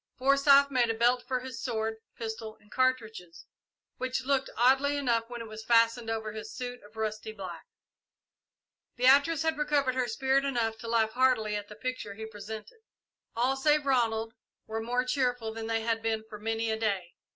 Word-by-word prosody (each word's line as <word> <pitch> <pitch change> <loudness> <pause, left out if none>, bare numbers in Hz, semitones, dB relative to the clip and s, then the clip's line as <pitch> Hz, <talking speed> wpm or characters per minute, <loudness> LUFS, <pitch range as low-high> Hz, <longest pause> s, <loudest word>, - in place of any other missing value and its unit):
Forsyth 275 +1 +5
made 245 -3 +2
a 225 - 0
belt 240 +2 +3
for 255 -2 -1
his 255 -2 -7
sword, 220 -2 -2 0.2
pistol, 220 -1 -6
and 210 - -25
cartridges, 225 -9 -1 0.5
which 255 0 -2
looked 270 -1 +1
oddly 270 +4 +4
enough 235 -4 0
when 240 -1 -6
it 230 - -7
was 215 0 -8
fastened 230 0 +3
over 220 -1 -2
his 215 0 -7
suit 245 0 -6
of 210 +2 -18
rusty 220 0 -3
black. 185 -6 -8 1.3
Beatrice 280 +5 +4
had 320 -1 0
recovered 290 -3 +2
her 255 -1 0
spirit 265 +4 +1
enough 230 -5 -1
to 230 - -8
laugh 225 -1 +2
heartily 245 -4 +2
at 205 0 -4
the 210 - -11
picture 235 -3 -5
he 220 +1 -6
presented. 220 - -9 0.6
All 250 +3 +2
save 295 +2 +2
Ronald 225 -4 +1 0.3
were 220 0 -4
more 245 +2 0
cheerful 245 -4 0
than 225 0 -5
they 225 0 0
had 225 0 0
been 220 -1 -1
for 210 -1 -9
many 225 +1 -1
a 220 - -2
day. 195 -6 -1
230 Hz, 180 wpm, -29 LUFS, 220-260 Hz, 1.3 s, Forsyth